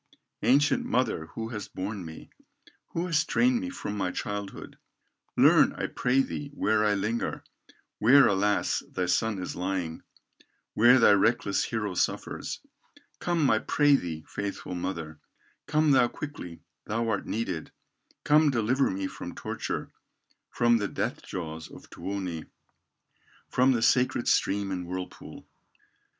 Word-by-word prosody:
"Ancient 145 +3 +3
mother 115 -11 0
who 115 0 -4
hast 105 -3 -7
borne 95 +1 -4
me, 80 -1 -10 0.6
Who 170 - -1
hast 160 -5 +1
trained 250 0 +3
me 275 - -4
from 105 - -5
my 95 -3 -1
childhood, 100 +1 -6 0.6
Learn, - - +6
I - - -3
pray 130 +2 +1
thee, 145 +1 -5
where 110 -4 +2
I 105 -1 +3
linger, 110 +4 -2 0.6
Where 130 +6 +7
alas! 100 +1 +1
thy 90 - -1
son 100 +4 +1
is 90 - -5
lying, 90 -3 -3 0.7
Where 120 +4 +6
thy 115 - +6
reckless 100 -1 +2
hero 105 -4 -2
suffers. - - -2 0.6
Come, 170 -5 +1
I 110 - +3
pray 145 +3 +3
thee, 80 - -4
faithful 100 -2 -5
mother, 85 -4 -4 0.5
Come 155 0 +3
thou 125 -3 +5
quickly, 120 - -8 0.2
thou 115 +2 -1
art 100 -3 -1
needed, 95 -8 -3 0.5
Come 150 +1 +5
deliver 130 +2 +2
me 95 +1 -3
from - - -7
torture, - - -4 0.6
From 120 -1 +3
the 105 -2 -1
death - - -3
jaws 80 -3 -6
of - - -14
Tuoni, 95 -5 -4 1.0
From 130 +1 +4
the 115 -2 0
sacred 125 0 +2
stream 100 0 +1
and 90 -2 -4
whirlpool." 90 0 -7
105 Hz, 135 wpm, -28 LUFS, 95-125 Hz, 1.0 s, Where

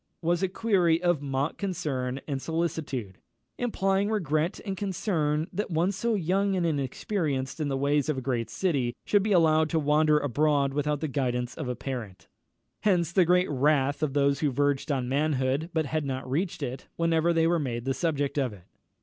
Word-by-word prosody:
_" - - -50 0.2
was 175 +1 +2
a 190 - +2
query 185 -5 +2
of 175 -4 +2
mock 140 +1 -2
concern 145 -10 -2
and 140 -3 -2
solicitude, 155 - -3 0.4
implying 195 -4 +1
regret 165 -5 0
and 195 -2 -2
concern 165 -6 -1
that 205 +3 -2
one 170 +3 +1
so 220 +4 -1
young 195 +2 +1
and 180 -2 0
inexperienced 140 - -2
in 150 - -1
the 135 -1 -1
ways 145 +1 +1
of 150 - 0
a - - 0
great 120 -3 -2
city 140 -10 0
should 205 - +3
be 210 +2 -1
allowed 160 -3 +4
to 165 - 0
wander 150 0 +3
abroad 145 0 +1
without 150 0 -1
the 155 - -1
guidance 125 -3 -1
of 155 -5 -5
a 125 - -2
parent. 120 -7 -6 0.5
Hence 175 -6 +2
the 180 0 +4
great 180 0 +3
wrath 140 +1 +2
of 150 -3 0
those 140 -1 +2
who 150 - +2
verged 145 +2 0
on 130 -3 -1
manhood, 140 +2 0
but 160 -1 0
had 155 +2 -1
not 130 -1 -4
reached 160 +4 -2
it, 130 0 -5
whenever 165 0 +2
they 165 -1 +3
were 170 0 +2
made 120 -4 -3
the 135 - +1
subject 145 -3 -1
of 130 -5 -1
it. 95 -3 -14
150 Hz, 190 wpm, -27 LUFS, 135-170 Hz, 0.5 s, allowed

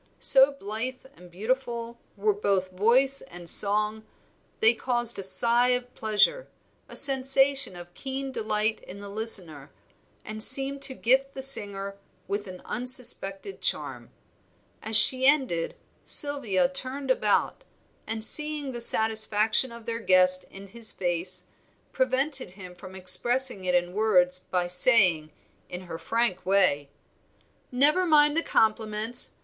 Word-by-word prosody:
So 270 +1 +5
blithe 250 +2 -5
and 180 +1 -17
beautiful 235 +4 -5 0.2
were 210 +1 0
both 195 -2 -3
voice 250 +8 +1
and 175 0 -13
song 210 +3 0 0.6
they 225 +1 +4
caused 240 -1 -3
a - - -6
sigh 235 +5 +3
of 250 0 -15
pleasure, 220 - -1 0.4
a - - -12
sensation 270 -3 +3
of 175 0 -13
keen 270 +3 -7
delight 215 -2 -2
in 195 - -13
the 200 0 -11
listener, 185 -9 -1 0.6
and 215 0 -8
seemed 275 +3 +4
to 265 - -2
gift 270 +3 -1
the 265 - -7
singer 200 -6 +1 0.3
with 205 +1 -5
an 185 -1 -12
unsuspected 250 - 0
charm. - - -4 0.7
As 220 0 +1
she 260 +4 +6
ended 260 - 0 0.3
Sylvia 270 -8 +2
turned 270 0 -3
about, 210 -5 -1 0.4
and 220 0 -1
seeing 300 +1 +1
the 240 -1 -7
satisfaction 220 +1 +2
of 235 -1 -13
their 230 -1 -5
guest 185 -3 +3
in 195 0 -13
his 230 +1 +2
face, 175 0 -3 0.5
prevented 260 -3 0
him 180 -2 -12
from 185 +1 -14
expressing 220 +3 0
it 180 0 -1
in 175 0 -2
words 185 -4 0
by 180 -1 -4
saying, 180 -4 +2 0.4
in 180 - -8
her 170 -3 -10
frank 230 -5 -2
way 180 -7 +1 0.8
"Never 300 +8 +3
mind 295 -2 +3
the 330 - 0
compliments. 220 -1 -1
220 Hz, 135 wpm, -25 LUFS, 190-260 Hz, 0.8 s, she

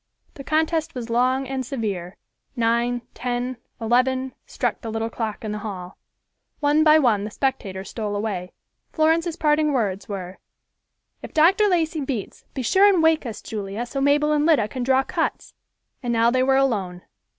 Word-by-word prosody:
The 275 - -9
contest 315 +1 0
was 235 -2 -5
long 255 +3 +2
and 265 0 -3
severe. 205 -8 -4 0.4
Nine, 235 +1 +1
ten, 245 0 -3 0.2
eleven, 255 +3 +1
struck - - -2
the 230 - -5
little 225 +1 -2
clock 220 -2 -4
in 215 - -3
the 210 - -3
hall. 190 -4 -7 0.6
One 295 +1 +3
by 310 0 +7
one 235 -9 +3
the 210 - -4
spectators 200 -6 -3
stole 210 -3 -3
away. 200 -4 -3 0.4
Florence's 325 +1 +2
parting 305 -2 +2
words 200 -6 -1
were, 185 -2 -6 0.8
"If - - -10
Dr. 375 +7 +5
Lacey 325 -4 +1
beats, 260 -7 -5
be 265 - -2
sure 390 - +5
and 355 -4 +2
wake 320 -4 +3
us, 225 - -7
Julia, 210 +2 -4
so 275 +3 -4
Mabel 295 +2 +3
and 300 -1 +2
Lida 300 -10 +3
can 255 - -5
draw 265 +2 +3
cuts." - - -3 0.5
And 245 -2 -2
now 230 0 +3
they 255 +1 +2
were 265 +1 +3
alone. 195 -10 0
250 Hz, 170 wpm, -23 LUFS, 215-295 Hz, 0.8 s, by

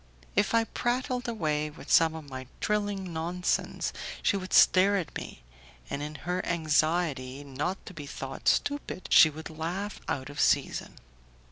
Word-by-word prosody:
If - - +2
I 230 - +5
prattled 250 +2 -1
away 155 -9 -1
with 150 - -10
some 160 -1 +5
of 155 -2 -8
my 130 -1 -7
trilling 205 -4 -1
nonsense, 175 +3 -1 0.3
she - - +3
would 185 -1 -4
stare 195 +2 +6
at 175 -5 -4
me, - - -7 0.5
and 140 - -2
in 150 +1 -5
her 180 +1 -1
anxiety 155 -4 0
not 145 +7 -3
to - - -9
be 150 -4 -8
thought 135 -2 -6
stupid, 285 -9 0
she 160 - +9
would 160 +1 -8
laugh 175 +6 -4
out 135 +1 -2
of 145 - -8
season. - - +1
165 Hz, 155 wpm, -29 LUFS, 150-195 Hz, 0.5 s, she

